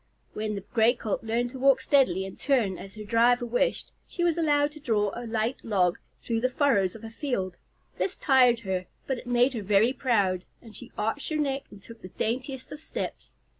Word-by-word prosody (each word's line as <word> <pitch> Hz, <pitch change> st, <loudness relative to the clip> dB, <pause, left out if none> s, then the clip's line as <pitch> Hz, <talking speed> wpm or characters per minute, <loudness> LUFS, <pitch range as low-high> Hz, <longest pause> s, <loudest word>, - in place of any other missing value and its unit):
When 215 Hz, 0 st, -3 dB
the 200 Hz, -, -4 dB
Gray 230 Hz, +1 st, +4 dB
Colt 220 Hz, -2 st, -3 dB
learned 235 Hz, +2 st, -1 dB
to 260 Hz, -, -8 dB
walk 270 Hz, 0 st, +5 dB
steadily 260 Hz, -9 st, +3 dB
and 190 Hz, -, -8 dB
turn 240 Hz, -9 st, +1 dB
as 195 Hz, +1 st, -10 dB
her 215 Hz, -, -7 dB
driver 235 Hz, +3 st, +3 dB
wished, 245 Hz, -, 0 dB, 0.2 s
she 345 Hz, -, -3 dB
was 340 Hz, -2 st, +3 dB
allowed 295 Hz, -3 st, +2 dB
to 305 Hz, -, -11 dB
draw 215 Hz, -7 st, +1 dB
a 240 Hz, 0 st, -6 dB
light 225 Hz, +2 st, -2 dB
log 185 Hz, -6 st, +1 dB, 0.2 s
through 230 Hz, -1 st, -1 dB
the 255 Hz, -, +2 dB
furrows 245 Hz, -9 st, +2 dB
of 225 Hz, -, -11 dB
a 225 Hz, -, -7 dB
field. 210 Hz, -9 st, -3 dB, 0.4 s
This 390 Hz, -, 0 dB
tired 250 Hz, -4 st, +4 dB
her, 185 Hz, -3 st, -3 dB, 0.2 s
but 265 Hz, -2 st, -2 dB
it -, -, -12 dB
made 245 Hz, +2 st, +3 dB
her 230 Hz, -, -3 dB
very 205 Hz, +5 st, +3 dB
proud, 200 Hz, -9 st, +1 dB, 0.2 s
and 225 Hz, -2 st, -14 dB
she 245 Hz, 0 st, -10 dB
arched 225 Hz, +7 st, -2 dB
her 310 Hz, -, -1 dB
neck 275 Hz, -2 st, -1 dB
and 200 Hz, -1 st, -14 dB
took 230 Hz, -1 st, -13 dB
the -, -, -8 dB
daintiest 255 Hz, +7 st, -3 dB
of 295 Hz, -, -7 dB
steps. -, -, -6 dB
235 Hz, 210 wpm, -27 LUFS, 210-265 Hz, 0.4 s, walk